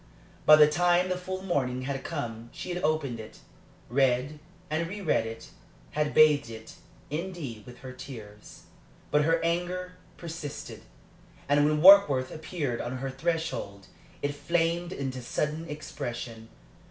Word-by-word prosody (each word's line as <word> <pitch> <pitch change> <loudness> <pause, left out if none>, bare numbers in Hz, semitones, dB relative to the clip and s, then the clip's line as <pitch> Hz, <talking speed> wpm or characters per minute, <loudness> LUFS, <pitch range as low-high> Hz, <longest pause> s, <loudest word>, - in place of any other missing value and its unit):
By 155 - +11
the 150 -1 +8
time 175 +3 +3
the 185 - +1
full 185 +1 -5
morning 130 -8 -1
had 135 0 -3
come 120 -7 -5
she - - -7
had 180 - -4
opened 150 -6 0
it, 110 - -10 0.5
read 135 +3 +1 0.3
and 160 +2 -1
reread 190 - 0
it 115 0 -8 0.4
had 150 0 -1
bathed 150 -4 +6
it, 110 -1 -9 0.4
indeed, 150 - -5
with 125 0 -12
her 130 - -8
tears. 110 -6 -11 0.5
But 150 0 +4
her 165 +1 +3
anger 180 +2 -1 0.2
persisted, 165 -3 -7 0.7
and 145 +1 +4
when 150 +1 +1
Warkworth 165 -10 +8
appeared 155 -6 -3
on 125 +2 -4
her 135 +1 -4
threshold 160 - -3 0.4
it 145 0 0
flamed 170 +3 0
into 130 -5 -4
sudden 150 +6 -2
expression. 120 -6 -6
150 Hz, 140 wpm, -28 LUFS, 130-170 Hz, 0.7 s, By